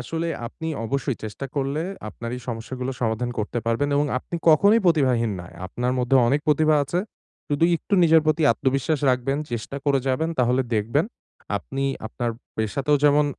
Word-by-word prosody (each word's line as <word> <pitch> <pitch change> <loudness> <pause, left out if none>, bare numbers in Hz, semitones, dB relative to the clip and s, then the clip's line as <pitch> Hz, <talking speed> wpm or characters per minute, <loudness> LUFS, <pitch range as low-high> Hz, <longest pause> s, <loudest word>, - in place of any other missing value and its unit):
আসলে 165 +6 -3 0.2
আপনি 160 +7 -6 0.2
অবশ্যই 135 +1 -1
চেষ্টা 110 +6 -5
করলে 140 +2 -1 0.3
আপনার 115 +3 -7
এই - - -8
সমস্যাগুলো 125 +3 -4
সমাধান 115 +1 -1
করতে 110 +2 -2
পারবেন 115 +5 +1
এবং 145 +1 +2
আপনি 170 - -6
কখনোই 200 +9 +6
প্রতিভাহীন 130 -9 +3
না 90 - -9
য় - - -15
আপনার 125 +7 -2
মধ্যে 125 +2 +3
অনেক 140 +4 +2
প্রতিভা 155 +1 +4
আছে, 160 +6 -2 0.5
শুধু 145 +2 +2
একটু 185 - -1
নিজের 160 -1 +6
প্রতি 155 +1 +2
আত্মবিশ্বাস 135 +5 0
রাখবেন, 130 +2 0
চেষ্টা 120 +4 -4
করে 140 -2 +3
যাবেন। 155 +5 +1
তাহলে 125 +1 +3
দেখবেন, 115 +9 +1 0.5
আপনি 135 +7 -4 0.2
আপনার 120 +1 -3 0.3
পেশাতেও 135 +7 +1
যেমন 145 0 +5
135 Hz, 165 wpm, -24 LUFS, 120-150 Hz, 0.5 s, কখনোই